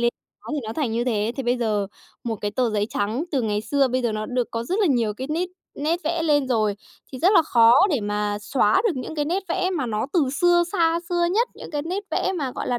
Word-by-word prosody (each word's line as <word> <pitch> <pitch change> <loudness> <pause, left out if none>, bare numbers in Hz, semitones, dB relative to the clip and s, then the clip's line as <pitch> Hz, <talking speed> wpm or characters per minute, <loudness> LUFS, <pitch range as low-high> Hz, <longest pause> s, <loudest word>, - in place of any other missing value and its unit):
lê 235 - +3 0.4
nó - - -9
thì 300 - -1
nó 220 - -4
thành 255 -4 -1
như 235 +1 0
thế. 225 -2 0
Thì 270 - -2
bây 245 +1 +1
giờ 215 -4 0 0.4
một 225 -2 -2
cái 205 - -2
tờ 250 -1 0
giấy 210 -1 0
trắng 220 +9 -1
từ 275 -5 0
ngày 210 -2 0
xưa, 270 +5 +1
bây 255 +1 -1
giờ 235 -2 0
nó 215 0 -3
được 250 -2 -1
có 230 0 -3
rất 370 - -1
là 395 - +4
nhiều 230 -7 +1
cái 260 +4 -5
nít 345 +3 -1 0.3
nét 325 +4 -1
vẽ 330 +1 0
lên 290 -4 +2
rồi 215 -4 +1 0.4
thì 255 - -6
rất 370 +8 +4
là 335 - +6
khó 235 -6 +5 0.2
để 275 -7 +1
mà 205 0 -1
xóa 215 - +2
được 410 - +2
những 255 +5 -5
cái 295 - 0
nét 355 +6 -1
vẽ 370 +1 0
mà 305 -9 -1
nó 215 +1 -2
từ 300 -8 +2
xưa, 350 0 +5
xa 335 -3 +2
xưa 345 -1 +1
nhất, 465 +4 +2
những - - -10
cái 295 -2 -2
nét 365 +5 -3
vẽ 380 - 0
mà, 270 -4 -2
gọi - - -4
là, 245 - 0
255 Hz, 270 wpm, -23 LUFS, 225-330 Hz, 0.4 s, là